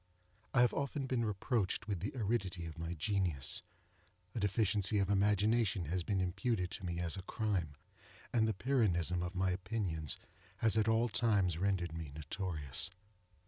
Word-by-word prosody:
I 125 - +4
have 125 - +4
often 140 0 -1
been 125 -3 0
reproached 105 0 0
with 100 -4 -1
the 100 +4 -3
aridity 100 -7 -1
of 80 0 -8
my 85 +1 -3
genius; 85 -5 0 0.7
a - - -2
deficiency 105 0 +2
of 100 0 +2
imagination 105 -1 +3
has 90 +4 -1
been 95 +2 0
imputed 95 +1 0
to - - -5
me 85 -1 -2
as 85 +2 -1
a - - -4
crime; 95 -7 -1 0.6
and 110 -2 +4
the 110 - +1
Pyrrhonism 95 - +2
of 90 +1 -4
my 95 0 +2
opinions 90 -6 -1 0.4
has 110 0 +2
at 110 -1 +3
all 115 +1 +4
times 100 -7 +2
rendered 95 -3 0
me 80 -4 -5
notorious. 75 -1 -1
95 Hz, 160 wpm, -35 LUFS, 85-110 Hz, 0.7 s, I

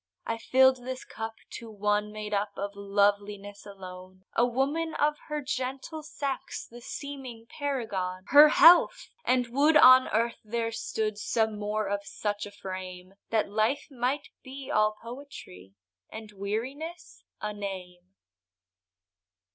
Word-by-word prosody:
I 230 0 -2
fill'd 260 +2 +5
this 255 +1 -6
cup 225 0 -6 0.2
to 230 - -10
one 210 0 0
made 210 0 -6
up 205 +1 0
Of 200 0 -3
loveliness 200 0 0
alone, 185 -1 -11
A 235 - +4
woman, 280 +7 0
of 300 0 +1
her 300 -1 -3
gentle 265 +4 -4
sex 285 -3 -4
The 240 +1 -13
seeming 260 -4 -7
paragon— 205 -11 -3
Her 295 +1 +9
health! 340 +3 +6 0.2
and 250 -1 +3
would 290 +5 +4
on 255 -2 +8
earth 230 +2 0
there 230 +1 -2
stood, 215 -1 -3
Some 220 -1 0
more 210 0 -1
of 200 0 -2
such 205 0 -3
a - - -11
frame, 185 -2 -8 0.2
That 220 -3 0
life 220 +9 0
might 265 +3 -2
be 270 +1 -8
all 215 -2 +3
poetry, 230 - -10 0.3
And 220 -1 -9
weariness 255 - -5 0.2
a 210 0 -3
name. 185 -2 -8
220 Hz, 135 wpm, -28 LUFS, 205-265 Hz, 0.3 s, Her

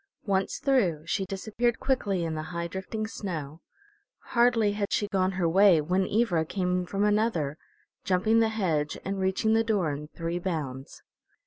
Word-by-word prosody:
Once 195 -2 0
through 185 - +1
she 190 +3 -1
disappeared 220 +5 -1
quickly 205 -9 0
in 165 -1 -2
the 155 - -3
high 170 -1 -3
drifting 190 +5 -4
snow. 165 -8 -6 0.7
Hardly 235 -3 +4
had 205 -1 -2
she 205 - +1
gone 190 -1 0
her 180 -2 0
way 190 0 +6
when 180 +5 0
Ivra 200 -7 +2
came 180 +1 -1
from 200 +2 -1
another, 210 -9 +1 0.5
jumping 195 +4 +2
the 225 -1 +3
hedge 165 -9 -1
and 195 0 -2
reaching 190 +3 +1
the 225 0 +3
door 205 -8 +1
in 145 +1 -6
three 170 +2 -4
bounds. 145 -7 -5
190 Hz, 160 wpm, -27 LUFS, 170-215 Hz, 0.7 s, way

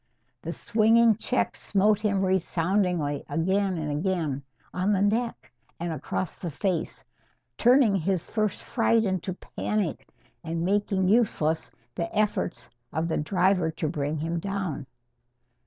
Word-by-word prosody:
The 165 - -4
swinging 225 +4 +4
check 250 +3 -1
smote 205 +1 +2
him 200 -2 +1
resoundingly 180 -4 +1
again 190 +5 +1
and 155 -2 -2
again, 160 -6 -1 0.3
on 185 +3 +1
the 195 - +1
neck 230 +3 -1 0.3
and 170 -1 -2
across 170 +3 -3
the 175 - -5
face, 165 0 -2 0.5
turning 245 - +5
his 185 -1 0
first 215 -2 -1
fright 230 -1 +2
into 190 -1 -1
panic, 205 -2 -3 0.4
and 165 +1 -2
making 195 -1 +1
useless 185 -7 +2 0.2
the 170 +6 -3
efforts 210 -4 0 0.2
of 160 +2 -1
the - - 0
driver 180 +1 +2
to 160 0 -3
bring 150 0 -2
him 165 +3 -2
down. 190 -7 -3
185 Hz, 130 wpm, -27 LUFS, 165-205 Hz, 0.5 s, turning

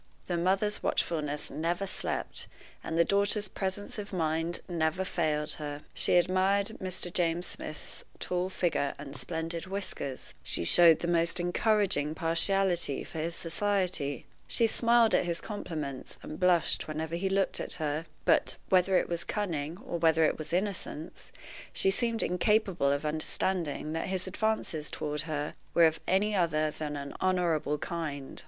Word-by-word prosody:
The 175 - -1
mother's 195 +4 +1
watchfulness 150 -3 -1
never 175 +4 -1
slept, 190 - -2 0.4
and 165 - -3
the 170 - +5
daughter's 200 +3 +2
presence 195 +3 -4
of 205 0 -6
mind 165 -1 0
never 170 +1 0
failed 155 -4 0
her. 145 0 -5
She - - +3
admired 190 +4 +2
Mr. 180 -1 -4
James 175 0 +1
Smith's 155 -3 -7 0.2
tall 180 +1 -1
figure 170 -6 0
and 140 0 -8
splendid 165 +2 -4
whiskers; 185 -9 -4
she - - 0
showed 165 - +7
the 170 - -1
most 170 +1 +2
encouraging 175 -4 +1
partiality 170 -1 +2
for 160 - -7
his 165 +2 -2
society; 175 - 0 0.2
she 230 - +2
smiled 230 0 +4
at - - +3
his 170 -1 -1
compliments, 155 - -5
and 155 - -7
blushed 180 -2 +3
whenever 155 +1 -3
he 190 +3 -1
looked 195 0 +1
at - - -2
her; 155 -1 -2 0.2
but, - - +3
whether 185 0 +4
it - - +1
was 170 -1 -2
cunning 165 -6 -2
or 170 - -3
whether 160 -1 +4
it 155 - +3
was 155 -1 -6
innocence, 180 -4 -3 0.4
she 195 - +3
seemed 230 +2 0
incapable 185 -4 +2
of 140 +2 -1
understanding 155 0 -1
that 165 - -2
his 185 -1 -2
advances 190 -6 -1
toward 150 -1 -2
her 150 -1 -2 0.2
were 170 - +7
of 160 0 +2
any 205 +3 +2
other 155 -4 +2
than 150 -1 -4
an 140 0 -6
honorable 170 -5 +1
kind. 150 -5 -5
170 Hz, 155 wpm, -30 LUFS, 155-190 Hz, 0.4 s, showed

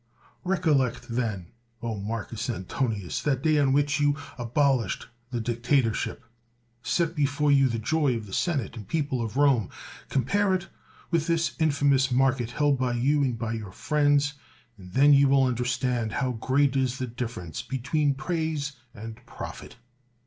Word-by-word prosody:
Recollect 135 -10 +1
then, 115 -6 -2 0.4
O 115 -2 -2
Marcus 110 +3 -4
Antonius, 105 -1 -2
that 135 -2 0
day 155 -1 +3
on 140 -2 +3
which 145 +1 +2
you 145 -1 +2 0.2
abolished 125 -3 0 0.2
the 120 -2 -3
dictatorship. 120 +1 0 0.6
Set 165 +3 0
before 145 0 +1
you 135 -1 +5
the 115 - -1
joy 140 +3 +1
of 110 -2 -5
the 95 - -11
senate 140 - -1
and 105 -4 -9
people 145 -6 -1
of 115 +2 -4
Rome; 135 -8 +3 0.4
compare 190 - +2
it 185 0 -4 0.4
with 165 -1 +1
this 165 -1 +1
infamous 140 -3 +3
market 125 -2 +2
held 145 +1 +1
by 125 -1 0
you 140 +5 +2
and 125 -4 0
by 115 0 -3
your 110 -4 -6
friends, 145 +3 +2 0.4
and 90 -4 -13
then 145 +4 +6
you 140 0 +6
will 135 0 +4
understand 125 -2 0
how 130 -2 0
great 135 +4 +1
is 130 -1 +1
the 130 - -2
difference 115 -9 -5
be 135 - -4
tween 140 +2 +1
praise 155 -1 -2 0.2
and 115 +2 -9
profit. - - -8
130 Hz, 155 wpm, -26 LUFS, 115-145 Hz, 0.6 s, then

